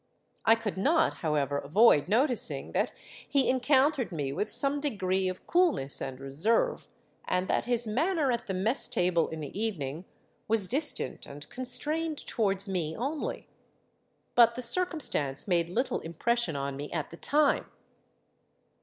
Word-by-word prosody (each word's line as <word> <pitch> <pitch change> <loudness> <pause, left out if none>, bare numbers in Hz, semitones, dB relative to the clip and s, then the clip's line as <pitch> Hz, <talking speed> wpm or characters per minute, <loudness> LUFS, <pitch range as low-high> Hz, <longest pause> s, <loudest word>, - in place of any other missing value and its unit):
I 225 - +6
could 225 -4 -5
not, 310 - +2
however, 145 -3 -1
avoid 155 +1 +4
noticing 245 +5 0
that - - 0 0.4
he 275 -2 +2
encountered 265 0 +2
me 145 -5 -3
with 205 - -2
some 280 +1 +3
degree 190 -9 0
of 185 - -8
coolness 335 - +2
and 130 -1 -5
reserve, 175 - 0 0.4
and 180 +1 -1
that - - 0
his 240 -1 0
manner 290 - 0
at 235 -1 -3
the 190 - -3
mess 215 +8 +4
table 175 -2 +1
in 160 -1 -7
the 145 - -8
evening 165 -7 -3 0.4
was 215 -3 +1
distant 290 +7 -2
and 145 +1 -10
constrained 300 +5 +2
towards 200 -3 -1
me 170 -5 -2
only. 280 +6 -4 0.9
But 235 -1 +5
the 250 - -5
circumstance 235 - -1
made 170 -3 +1
little 240 +9 -1
impression 175 +3 -1
on 140 0 -3
me 145 +2 -7
at 155 -4 -4
the 170 - -10
time. 295 - +1
215 Hz, 145 wpm, -28 LUFS, 160-265 Hz, 0.9 s, I